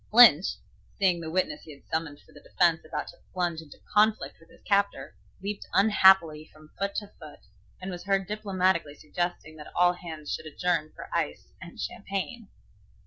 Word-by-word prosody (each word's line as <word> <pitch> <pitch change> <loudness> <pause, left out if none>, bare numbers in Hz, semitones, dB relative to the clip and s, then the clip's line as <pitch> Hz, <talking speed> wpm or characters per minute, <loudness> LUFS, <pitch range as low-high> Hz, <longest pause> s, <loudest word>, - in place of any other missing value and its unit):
Lynch, 215 -7 +7 0.4
seeing 180 -4 +2
the 160 - -5
witness 160 -3 -1
he 155 - -11
had 140 - -24
summoned 160 -3 -3
for - - -23
the - - -14
defence 170 -3 +2
about 155 - -5
to - - -14 0.2
plunge 175 -3 -1
into 150 -3 -14 0.2
conflict 215 +1 +2
with 165 - -21
his - - -20
captor, 200 -1 0 0.3
leaped 200 +1 -4
unhappily 190 -6 +5
from 155 0 -18
foot 200 0 -2
to 205 -2 -4
foot, 155 -3 -12 0.4
and 185 +1 -6
was 175 0 -8
heard 195 -1 +1
diplomatically 190 -6 0
suggesting 155 0 -4
that 150 - -11
all 175 0 +4
hands 160 -4 -7
should - - -5
adjourn 165 0 -1
for - - -9
ice - - -3
and - - -11
champagne. 200 +3 -4
180 Hz, 175 wpm, -27 LUFS, 155-195 Hz, 0.4 s, Lynch